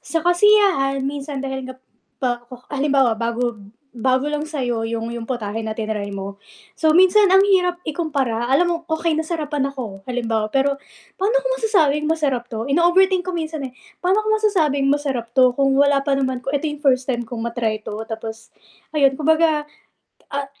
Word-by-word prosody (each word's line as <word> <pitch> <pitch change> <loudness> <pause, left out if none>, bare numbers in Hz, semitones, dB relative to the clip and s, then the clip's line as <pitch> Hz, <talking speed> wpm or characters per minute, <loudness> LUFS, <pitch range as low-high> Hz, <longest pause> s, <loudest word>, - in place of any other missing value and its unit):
sa 330 -1 -2
kasiyahan 350 -7 +4
minsan 280 0 -4
dahil 265 -1 -4
nga 260 - -7 0.5
pak 240 -1 -1 0.3
halimbawa, 275 -3 +2
bago 235 0 -2 0.4
bago 260 +4 +1
lang 300 0 -2
sa'yo 245 -7 -2
'yong 230 0 -3
'yong 235 -1 -5
putahe 225 -3 -4
na 220 - -2
tinray 215 -2 -4
mo. 195 0 -6 0.4
So, 315 -1 +3
minsan 375 +4 +6
ang 385 - +7
hirap 360 -3 +2
ikumpara. 280 -8 -2
Alam 350 +6 +4
mo 340 - +1 0.2
okey 320 0 0
nasarapan 305 -3 -2
ako 205 -7 -7
halimbawa, 230 -3 -1
pero 275 +1 +2 0.4
pa'no 395 +4 +1
ko - - -5
masasabing 315 - +2
masarap 290 -6 0
'to? 230 +1 -5
Ino-overthink 360 +3 +3
ko 370 - -2
minsan, 315 -3 -4
eh. 255 - -11 0.3
Pa'no 375 +4 +2
ko 430 - -4
masasabing 325 -11 +1
masarap 265 -5 -2
'to 255 -1 +6
kung 275 -1 +3
wala 280 0 +4
pa 280 - +1
naman 260 -2 -1
ko 270 - -3
ito 295 +2 0
yung 295 - -7
first 255 -1 +2
time 240 -1 -2
kong 235 -1 -6
ma-try 230 -2 -2
'to 210 - -6
tapos 225 0 -7 0.4
ayun 275 -3 +3
kumbaga, 315 0 +2 0.7
ah, 280 0 -3
275 Hz, 170 wpm, -21 LUFS, 240-320 Hz, 0.7 s, ang